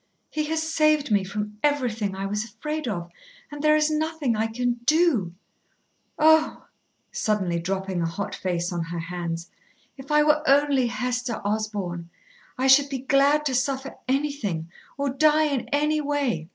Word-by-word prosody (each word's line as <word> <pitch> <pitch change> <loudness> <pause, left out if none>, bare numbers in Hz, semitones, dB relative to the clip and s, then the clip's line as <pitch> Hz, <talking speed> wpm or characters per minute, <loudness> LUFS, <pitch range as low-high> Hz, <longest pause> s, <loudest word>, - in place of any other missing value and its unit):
"He 305 -1 -1
has 320 +1 -1
saved 305 -4 +2
me 200 -2 +3
from 210 +2 -5
everything 235 -9 0
I 195 +1 -4
was 210 +2 -1
afraid 300 +7 -5
of, 175 -6 -4 0.4
and 290 0 -6
there 305 0 +5
is 305 0 +2
nothing 310 -5 0
I 220 +1 0
can 240 +1 -2
do. 295 - +3 0.8
Oh!" 315 0 +4 0.5
suddenly 190 -6 0
dropping 190 +1 -2
a 165 - 0
hot 200 +4 -4
face 175 -1 -2
on 170 - -2
her 170 +1 -6
hands, 170 0 -5 0.5
"if 270 0 -11
I 300 0 +5
were 300 0 +3
only 275 -2 +4
Hester 245 0 -2
Osborn. 205 -5 -3 0.5
I 260 - 0
should 275 +1 +6
be 275 - -2
glad 280 +3 +3
to 270 - 0
suffer 265 +2 -1
anything, 255 - -2 0.3
or 280 0 -1
die 305 +3 +4
in 280 -5 -2
any 300 +1 +1
way. 280 - -1
250 Hz, 160 wpm, -25 LUFS, 195-295 Hz, 0.8 s, should